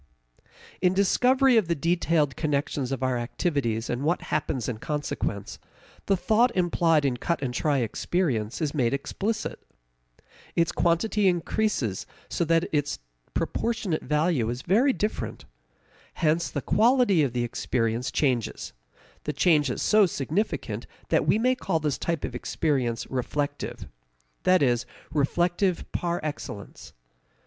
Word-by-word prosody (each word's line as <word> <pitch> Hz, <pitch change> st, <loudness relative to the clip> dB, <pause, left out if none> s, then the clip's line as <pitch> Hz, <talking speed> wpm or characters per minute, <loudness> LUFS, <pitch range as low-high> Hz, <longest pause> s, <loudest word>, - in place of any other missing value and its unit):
In 180 Hz, 0 st, +3 dB
discovery 250 Hz, +6 st, +4 dB
of 210 Hz, -6 st, +3 dB
the 170 Hz, -, +1 dB
detailed 165 Hz, -3 st, +1 dB
connections 140 Hz, -3 st, -1 dB
of 135 Hz, -1 st, -2 dB
our 130 Hz, -2 st, +1 dB
activities 120 Hz, -3 st, -1 dB
and 120 Hz, +1 st, -2 dB
what 165 Hz, +5 st, 0 dB
happens 135 Hz, -5 st, -1 dB
in 115 Hz, -3 st, -3 dB
consequence, 145 Hz, -9 st, -3 dB, 0.5 s
the 195 Hz, -, +3 dB
thought 225 Hz, +6 st, +3 dB
implied 170 Hz, -4 st, +2 dB
in 130 Hz, -3 st, +1 dB
cut 170 Hz, +7 st, -1 dB
and 125 Hz, -2 st, -2 dB
try 145 Hz, +3 st, +1 dB
experience 125 Hz, -, -1 dB
is 145 Hz, -, -1 dB
made 135 Hz, -3 st, +1 dB
explicit. 205 Hz, +10 st, -3 dB, 1.0 s
Its 170 Hz, 0 st, +2 dB
quantity 185 Hz, +5 st, +2 dB
increases 175 Hz, -, 0 dB, 0.2 s
so -, -, 0 dB
that 165 Hz, +2 st, +2 dB
its 145 Hz, -1 st, 0 dB, 0.4 s
proportionate 225 Hz, -8 st, -1 dB
value 150 Hz, -4 st, +1 dB
is 120 Hz, +2 st, -4 dB
very 230 Hz, +10 st, +4 dB
different. 215 Hz, -4 st, -3 dB, 0.7 s
Hence 165 Hz, +1 st, +1 dB
the 145 Hz, -, -4 dB
quality 230 Hz, -5 st, +4 dB
of 135 Hz, -5 st, 0 dB
the 120 Hz, -1 st, 0 dB
experience 120 Hz, 0 st, -1 dB
changes; 125 Hz, -6 st, -1 dB, 0.5 s
the 150 Hz, -, -1 dB
change 150 Hz, -1 st, +3 dB
is 125 Hz, -, -2 dB
so 210 Hz, -2 st, +5 dB
significant 165 Hz, +7 st, -2 dB, 0.2 s
that -, -, +2 dB
we -, -, +4 dB
may 250 Hz, +3 st, +3 dB
call 190 Hz, -10 st, -1 dB
this 150 Hz, -3 st, -1 dB
type 170 Hz, -3 st, -1 dB
of -, -, -6 dB
experience 125 Hz, -2 st, -1 dB
reflective 145 Hz, +3 st, -3 dB, 0.6 s
that 185 Hz, -4 st, +5 dB
is, 120 Hz, -2 st, +1 dB, 0.3 s
reflective 175 Hz, +5 st, +1 dB
par 175 Hz, 0 st, -1 dB
excellence. 145 Hz, -9 st, -7 dB
155 Hz, 135 wpm, -26 LUFS, 130-180 Hz, 1.0 s, so